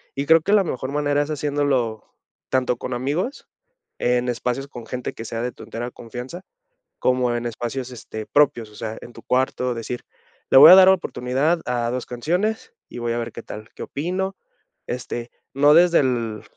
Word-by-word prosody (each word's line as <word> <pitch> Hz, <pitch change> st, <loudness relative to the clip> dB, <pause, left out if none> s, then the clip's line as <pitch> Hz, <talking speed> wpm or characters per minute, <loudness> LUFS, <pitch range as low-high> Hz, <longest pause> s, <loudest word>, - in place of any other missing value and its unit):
y 140 Hz, -, -2 dB
creo 165 Hz, +2 st, +6 dB
que 200 Hz, -, 0 dB
la 205 Hz, -2 st, +5 dB
mejor 130 Hz, -5 st, -4 dB
manera 145 Hz, 0 st, +1 dB
es 145 Hz, -, -9 dB
haciéndolo 140 Hz, -7 st, -1 dB, 0.4 s
tanto 125 Hz, -1 st, +1 dB
con 125 Hz, -, -5 dB
amigos, 145 Hz, -, -3 dB, 0.5 s
en 125 Hz, 0 st, +1 dB
espacios 125 Hz, +3 st, -2 dB
con 120 Hz, -5 st, -10 dB
gente 125 Hz, -1 st, -4 dB
que 115 Hz, -, -8 dB
sea 115 Hz, 0 st, -4 dB
de 125 Hz, +1 st, -2 dB
tu -, -, -12 dB
entera 120 Hz, +2 st, -5 dB
confianza, 125 Hz, +10 st, -8 dB, 0.6 s
como 125 Hz, -1 st, +1 dB
en 120 Hz, -, -3 dB
espacios 120 Hz, +2 st, -4 dB
este 110 Hz, -3 st, -8 dB
propios, 120 Hz, -6 st, +2 dB
o -, -, -17 dB
sea, 110 Hz, +1 st, -5 dB
en 120 Hz, -, -11 dB
tu -, -, -12 dB
cuarto 125 Hz, -1 st, 0 dB
decir: 120 Hz, +1 st, -5 dB, 0.5 s
"Le -, -, +7 dB
voy 140 Hz, -, +11 dB
a -, -, +12 dB
dar 190 Hz, 0 st, +8 dB
oportunidad 150 Hz, -2 st, +1 dB
a 120 Hz, -1 st, -1 dB
2 125 Hz, 0 st, -3 dB
canciones 185 Hz, -, -2 dB, 0.2 s
y -, -, -9 dB
voy 120 Hz, 0 st, -1 dB
a 120 Hz, -, -2 dB
ver 115 Hz, -, -4 dB
qué 115 Hz, -, -9 dB
tal, 110 Hz, +1 st, -9 dB
qué -, -, -6 dB
opino", 185 Hz, +6 st, -3 dB, 0.5 s
este, 120 Hz, -1 st, -5 dB, 0.2 s
no 145 Hz, +2 st, +5 dB
desde 175 Hz, 0 st, +6 dB
el, 115 Hz, -5 st, -2 dB
125 Hz, 190 wpm, -22 LUFS, 120-150 Hz, 0.6 s, a